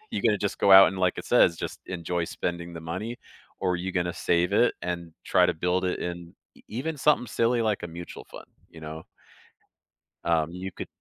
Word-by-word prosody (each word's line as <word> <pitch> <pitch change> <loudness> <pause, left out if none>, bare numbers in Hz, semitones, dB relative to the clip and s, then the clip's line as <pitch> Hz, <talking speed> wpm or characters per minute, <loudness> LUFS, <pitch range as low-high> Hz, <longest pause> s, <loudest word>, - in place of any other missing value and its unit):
You're - - -2
going 115 - +4
to - - +1
just 100 0 -2
go 100 - +3
out 95 0 +10
and, 95 - -5
like, 90 -1 +1
it - - -6
says, 85 - +4
just - - -6
enjoy 85 -1 -2
spending 85 0 -4
the 80 - -7
money, 95 +9 -4 0.4
or 90 -1 +1
you're 95 +2 -4
gonna 90 -1 0
save 85 +3 +1
it 120 +4 +4
and 85 -1 -4
try - - +4
to - - 0
build 90 +3 0
it 90 - -2
in 85 -1 -6 0.3
even 145 +7 -4
something 145 -3 +3
silly, 115 +1 +1
like, 110 -3 0
a - - -3
mutual 85 +1 -9
fund, - - -12 0.2
you 80 - -14
know. 80 +1 -7 1.2
Um, 80 -1 +1
you 95 +2 -6
could - - -8
90 Hz, 205 wpm, -26 LUFS, 85-100 Hz, 1.2 s, out